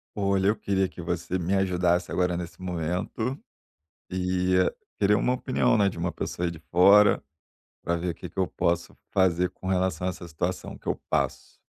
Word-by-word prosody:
Olha, 100 Hz, -1 st, +1 dB
eu 105 Hz, -, +3 dB
queria 95 Hz, -1 st, 0 dB
que 85 Hz, -, -9 dB
você 85 Hz, +1 st, -2 dB
me 90 Hz, +3 st, 0 dB
ajudasse 90 Hz, -2 st, +1 dB
agora 90 Hz, -1 st, +1 dB
nesse 85 Hz, +1 st, -6 dB
momento. 90 Hz, -, -3 dB, 0.7 s
E 90 Hz, 0 st, +1 dB, 0.4 s
queria 105 Hz, +1 st, +4 dB
uma 125 Hz, -, +2 dB
opinião, 125 Hz, -2 st, +1 dB
né, 100 Hz, -2 st, +4 dB
de 95 Hz, -, -3 dB
uma 85 Hz, +1 st, -1 dB
pessoa 85 Hz, +1 st, -3 dB
de 80 Hz, -, -10 dB
fora, 100 Hz, +4 st, +6 dB, 0.6 s
pra 85 Hz, -, 0 dB
ver 85 Hz, 0 st, -2 dB
que -, -, -9 dB
que -, -, -15 dB
eu 95 Hz, -, +3 dB
posso 85 Hz, -1 st, -1 dB
fazer 90 Hz, -1 st, +2 dB
com 95 Hz, -, -11 dB
relação 90 Hz, -2 st, 0 dB
a -, -, +1 dB
essa 90 Hz, -1 st, -8 dB
situação 85 Hz, +3 st, -4 dB
que -, -, -26 dB
eu -, -, 0 dB
passo. 70 Hz, -4 st, -1 dB
90 Hz, 180 wpm, -26 LUFS, 85-95 Hz, 0.7 s, fora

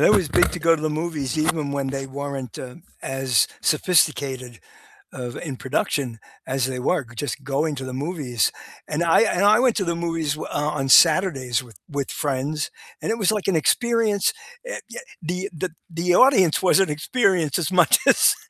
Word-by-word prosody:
that -, -, +5 dB
was 190 Hz, -7 st, +3 dB
big -, -, +3 dB
to 180 Hz, -, -4 dB
go 165 Hz, 0 st, +4 dB
to -, -, -8 dB
the 155 Hz, -, 0 dB
movies 155 Hz, -3 st, -3 dB
even 155 Hz, -2 st, 0 dB
when 140 Hz, -1 st, -2 dB
they 135 Hz, 0 st, -4 dB
weren't, 135 Hz, -2 st, -6 dB
uh, 125 Hz, +2 st, -8 dB, 0.3 s
as 135 Hz, -4 st, +1 dB
sophisticated 140 Hz, -, +1 dB, 0.5 s
of, 125 Hz, -2 st, -6 dB
in 140 Hz, -6 st, -6 dB
production 135 Hz, -3 st, -2 dB, 0.3 s
as 130 Hz, -1 st, 0 dB
they 130 Hz, -1 st, -4 dB
were. 140 Hz, +2 st, 0 dB
Just 140 Hz, +2 st, -4 dB
going 145 Hz, +3 st, -1 dB
to 130 Hz, -1 st, -6 dB
the 130 Hz, -, -6 dB
movies, 135 Hz, -, -1 dB, 0.4 s
and 155 Hz, +3 st, -1 dB
I 165 Hz, -, +4 dB
and 200 Hz, -3 st, +2 dB
I 215 Hz, +3 st, +6 dB
went 250 Hz, -3 st, +3 dB
to 195 Hz, -, 0 dB
the 170 Hz, 0 st, -1 dB
movies 165 Hz, -3 st, -2 dB
w 155 Hz, -, -7 dB
uh, 150 Hz, +1 st, -1 dB
on 135 Hz, 0 st, -2 dB
Saturdays 140 Hz, -7 st, +4 dB
with 115 Hz, -7 st, -17 dB
with 140 Hz, -2 st, -4 dB
friends, 145 Hz, +2 st, -2 dB, 0.3 s
and -, -, -2 dB
it 230 Hz, -, -2 dB
was, 200 Hz, +1 st, +3 dB
like, 210 Hz, -3 st, -2 dB
an 190 Hz, -, +2 dB
experience. 230 Hz, -, +1 dB, 0.4 s
Uh, -, -, -4 dB
y -, -, -8 dB, 0.2 s
the 180 Hz, +4 st, -4 dB
the 175 Hz, +3 st, -3 dB, 0.2 s
the 175 Hz, +2 st, 0 dB
audience 195 Hz, -, +5 dB
was 190 Hz, -, +4 dB
an 190 Hz, -4 st, +2 dB
experience 170 Hz, -, 0 dB
as 170 Hz, +1 st, -2 dB
much 180 Hz, -5 st, +5 dB
as -, -, +5 dB
155 Hz, 190 wpm, -22 LUFS, 135-180 Hz, 0.5 s, I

